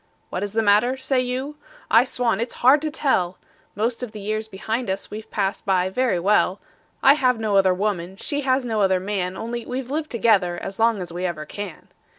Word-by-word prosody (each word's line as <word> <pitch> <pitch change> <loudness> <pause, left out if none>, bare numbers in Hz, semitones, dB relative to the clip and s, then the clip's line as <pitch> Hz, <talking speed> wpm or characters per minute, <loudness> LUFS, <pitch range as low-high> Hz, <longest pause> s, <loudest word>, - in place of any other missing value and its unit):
"What 180 - -3
is 205 0 -4
the 225 0 +1
matter?" 215 +5 +3
say 260 0 0
you. 260 +4 -3 0.3
I 230 +3 +6
swan 245 -3 0
it's 235 - -4
hard 280 +3 +7
to 310 - -1
tell! 190 - 0 0.4
Most 230 +4 -1
of 240 -3 -5
the 215 - -7
years 215 +2 -2
behind 220 +3 -3
us 190 +1 -3
we've 215 +1 -7
passed 195 -1 -2
by 185 -3 +1
very 250 -2 +1
well; 195 +1 +2 0.4
I 270 - +8
have 255 -5 +2
no 215 -2 0
other 190 -1 +5
woman, 190 -2 -2
she 290 +6 -2
has 260 -1 +1
no 220 -3 0
other 190 -1 +3
man 190 -1 -3
Only 235 +1 -4
we've 255 +2 -5
lived 305 +1 -2
together 200 -7 +2
as 195 +2 -7
long 225 -4 +2
as 170 -1 -9
we 175 +1 -4
ever 155 -3 -5
can. 200 +1 -8
220 Hz, 210 wpm, -23 LUFS, 190-250 Hz, 0.4 s, I